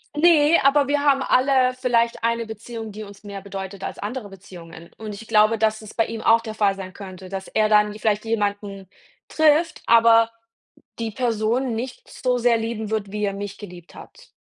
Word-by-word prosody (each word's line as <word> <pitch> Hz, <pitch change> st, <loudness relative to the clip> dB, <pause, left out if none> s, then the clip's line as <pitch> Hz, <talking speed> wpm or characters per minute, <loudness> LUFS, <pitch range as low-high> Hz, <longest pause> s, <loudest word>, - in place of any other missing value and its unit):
Ne, 315 Hz, 0 st, +5 dB
aber 280 Hz, +1 st, +4 dB
wir 290 Hz, 0 st, +1 dB
haben 275 Hz, -2 st, +3 dB
alle 255 Hz, -1 st, +2 dB
vielleicht 235 Hz, -2 st, 0 dB
eine 230 Hz, 0 st, 0 dB
Beziehung, 220 Hz, 0 st, -8 dB
die 215 Hz, +1 st, -8 dB
uns 200 Hz, 0 st, -13 dB
mehr 200 Hz, -1 st, -8 dB
bedeutet 195 Hz, 0 st, -7 dB
als -, -, -6 dB
andere 215 Hz, +1 st, -5 dB
Beziehungen. 170 Hz, -3 st, -13 dB
Und 215 Hz, -1 st, -7 dB
ich 220 Hz, +2 st, -10 dB
glaube, 215 Hz, 0 st, +3 dB
dass 220 Hz, 0 st, +1 dB
es 215 Hz, -, -11 dB
bei 225 Hz, -, +1 dB
ihm 225 Hz, -1 st, -6 dB
auch 225 Hz, 0 st, +4 dB
der 220 Hz, -1 st, -7 dB
Fall 205 Hz, -2 st, +2 dB
sein 190 Hz, -1 st, -9 dB
könnte, 190 Hz, -2 st, -10 dB
dass 190 Hz, 0 st, -6 dB
er 215 Hz, 0 st, +1 dB
dann 210 Hz, -1 st, +4 dB
vielleicht 210 Hz, 0 st, -1 dB
jemanden 205 Hz, -3 st, -3 dB, 0.4 s
trifft, 315 Hz, +1 st, +2 dB
aber 230 Hz, 0 st, +5 dB, 0.7 s
die 225 Hz, -1 st, -3 dB
Person 235 Hz, +1 st, -1 dB
nicht 250 Hz, +3 st, -7 dB
so 250 Hz, -1 st, -1 dB
sehr 235 Hz, -1 st, +3 dB
lieben 225 Hz, -1 st, -4 dB
wird, 215 Hz, -3 st, -3 dB
wie 210 Hz, 0 st, -3 dB
er 200 Hz, -, 0 dB
mich 200 Hz, 0 st, -6 dB
geliebt 180 Hz, -4 st, -12 dB
hat. -, -, -14 dB
220 Hz, 190 wpm, -22 LUFS, 205-240 Hz, 0.7 s, Ne